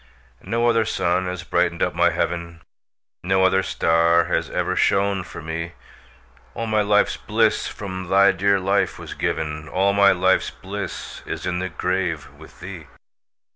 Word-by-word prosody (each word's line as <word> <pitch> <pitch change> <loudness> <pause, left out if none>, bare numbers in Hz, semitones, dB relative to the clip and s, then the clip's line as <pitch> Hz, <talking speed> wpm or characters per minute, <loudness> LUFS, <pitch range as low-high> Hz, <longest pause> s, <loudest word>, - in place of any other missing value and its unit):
No 115 +1 0
other 115 -1 +3
sun 90 -3 0
has 90 0 -4
brightened 85 -1 0
up - - 0
my - - +3
heaven, 85 -1 -3 0.6
No 95 +1 +2
other 95 +1 +3
star 85 -1 +2
has - - -1
ever - - -1
shone 100 -1 +2
for 85 - -9
me; 85 +1 -5 0.8
All 115 - -3
my 110 -1 +1
life's 105 0 +2
bliss - - +1
from 95 -3 -6
thy 100 +1 +5
dear 100 +1 +2
life 100 +2 0
was - - -8
given, 75 -1 -3
All 100 +2 +2
my 100 0 +6
life's 95 +1 +2
bliss 95 -1 -7
is - - -5
in 90 -1 -1
the 95 0 -3
grave 85 -3 -2
with - - -16
thee. 90 -5 -8
95 Hz, 160 wpm, -22 LUFS, 85-100 Hz, 0.8 s, my